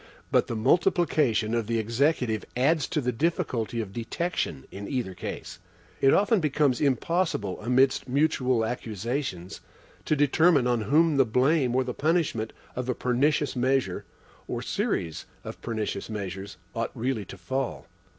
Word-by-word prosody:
But - - +3
the 115 - -3
multiplication 145 - +2
of 115 -3 0
the 115 0 0
Executive 115 0 +1
adds 145 +3 +2
to 155 - -1
the 125 -1 0
difficulty 125 - -1
of 100 -3 -7
detection 115 - -3
in 100 +1 -7
either 125 -9 -2
case. 85 - -7 0.4
It 135 - +6
often 205 +2 +4
becomes 145 -5 +1
impossible, 140 - 0
amidst 130 +3 +2
mutual 130 -4 +2
accusations, 110 -4 -4 0.4
to 155 - +2
determine 145 0 +4
on 120 -2 +1
whom 150 +7 +3
the 135 - +6
blame 130 +2 +2
or 130 - +3
the 125 -1 -4
punishment 150 -9 0 0.2
of 125 0 -3
a 125 - +1
pernicious 140 +3 +1
measure, 130 -6 +1 0.4
or - - -3
series 80 -2 -2 0.2
of - - -8
pernicious 110 -3 -3
measures, 100 -4 -5 0.2
ought 115 0 -2
really 120 -3 -2
to 95 - -10
fall. 130 +5 -3
125 Hz, 145 wpm, -27 LUFS, 110-145 Hz, 0.4 s, It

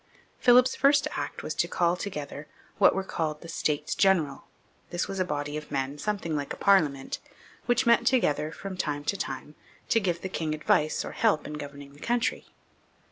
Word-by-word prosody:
Philip's 250 0 +6
first 280 +1 +4
act - - -4
was - - -3
to - - 0
call 175 0 +1
together 150 -6 -6 0.3
what - - +6
were 195 - -1
called 155 -5 -3
the 170 - -10
States 150 -2 -1
General. 165 -8 +2 0.4
This 175 - -2
was 195 - -4
a - - +3
body 145 -3 -3
of 150 - -8
men, 140 +1 -2
something 195 -4 -2
like 145 -1 -3
our - - -20
Parliament, 150 -9 +2 0.5
which 245 +1 +3
met 235 0 +4
together 155 - +2
from 195 +3 -7
time 145 -4 -2
to 200 - -1
time 145 -4 -5 0.4
to 225 - +4
give 175 -5 -1
the - - -1
king 160 -4 -2
advice 155 0 +1
or - - -6
help 215 -9 +1
in 150 - -6
governing 140 -1 -8
the 145 - -17
country. 240 +5 -1
160 Hz, 190 wpm, -28 LUFS, 145-200 Hz, 0.5 s, Philip's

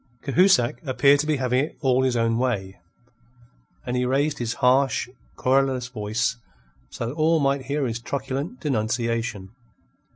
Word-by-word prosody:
Cahusac 140 -6 +3
appeared 140 +1 +3
to 150 - -1
be 155 - +2
having 130 0 +1
it 155 - -7
all 130 -3 +2
his 130 -2 +1
own 115 0 +1
way, 100 -7 -2 1.1
and 125 - -2
he 125 - +1
raised 140 +4 0
his 115 -2 -2
harsh, 130 +2 +2 0.3
querulous 130 -1 +1
voice 115 +1 -2 0.5
so 115 - -5
that 120 - -4
all 160 +1 +2
might 140 -2 0
hear 140 +1 -1
his 120 -1 -3
truculent 140 - -4
denunciation. 115 - -2
130 Hz, 150 wpm, -24 LUFS, 120-140 Hz, 1.1 s, Cahusac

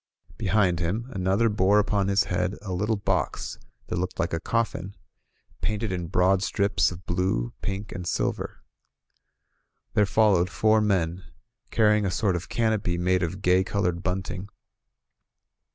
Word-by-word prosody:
Behind 95 -5 +2
him, 90 +7 -1
an 95 -6 -3
other 100 +5 +3
bore 105 -1 +3
upon 100 -1 +2
his 100 0 +3
head 90 +2 -1
a 95 -3 -4
little 105 +5 0
box 100 - -2 0.3
that - - -3
looked 90 +1 -3
like 85 -3 -1
a 80 - 0
coffin, 100 -2 -2 0.7
painted 110 -1 -1
in 90 -2 -3
broad 90 +3 +3
strips 100 +1 +2
of 90 +1 -10
blue, 85 -9 -1
pink 100 +2 -4
and 90 -3 -6
silver. - - -2 1.3
There 105 -1 +3
followed 100 -5 +3
four 110 0 +3
men, 90 -4 0 0.5
carrying 105 -2 +3
a - - 0
sort 95 0 +1
of 85 - -5
canopy 110 -6 0
made 90 +1 +1
of 95 +3 -3
gay 90 +1 +4
colored 90 -3 -1
bunting. 95 +1 -3
95 Hz, 150 wpm, -26 LUFS, 90-105 Hz, 1.3 s, gay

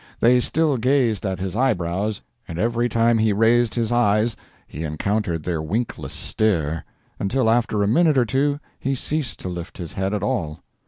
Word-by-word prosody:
They 125 +2 +5
still 150 +2 +1
gazed 120 -5 +1
at 95 -1 -2
his 95 +1 -4
eyebrows, 105 -4 0 0.2
and 85 - -6
every 120 +4 +1
time 115 0 +3
he 110 -1 +3
raised 115 +2 +3
his 115 -2 0
eyes 110 -1 +2 0.3
he 75 - -7
encountered 85 +2 -1
their 85 -2 -2
winkless 105 +10 -3
stare—until 100 - -1
after 110 -2 +2
a - - +1
minute 155 +6 +3
or 125 - +4
two 140 +4 0 0.2
he 135 +1 -1
ceased 150 +1 -3
to - - -5
lift 90 -1 -6
his 85 -4 -6
head 95 +2 -1
at 100 - -3
all. 75 -6 -2
110 Hz, 170 wpm, -22 LUFS, 95-120 Hz, 0.3 s, They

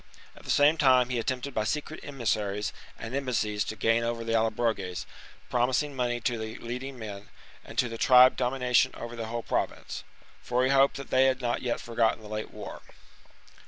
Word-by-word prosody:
At - - -15
the - - -10
same 145 +3 +5
time 130 -3 +5
he 125 -2 -1
attempted 130 +3 -3
by 110 - 0
secret 150 +6 -3
emissaries 105 -7 -2 0.2
and 115 - -7
embassies 115 -6 0
to 110 - -5
gain 115 +1 +2
over 115 0 -2
the 115 0 -2
Allobroges, 110 -5 0 0.4
promising 130 +4 +1
money 120 -2 0
to 120 -1 -1
the 110 0 -5
leading 125 +3 -6
men, 105 -3 -8 0.3
and - - -12
to 120 - +3
the 115 -1 -7
tribe 130 0 +7
dominion 125 -1 +2
over 120 0 -7
the 115 -1 -5
whole 115 +1 -4
Province; - - -3 0.4
for 125 +1 0
he 130 - +2
hoped 135 0 +4
that 140 - -9
they 130 +1 +5
had 130 -1 +2
not 120 -2 -1
yet 125 -2 -1
forgotten 115 -1 0
the 105 - -10
late 110 0 -4
war. - - -9
120 Hz, 190 wpm, -28 LUFS, 115-130 Hz, 0.4 s, tribe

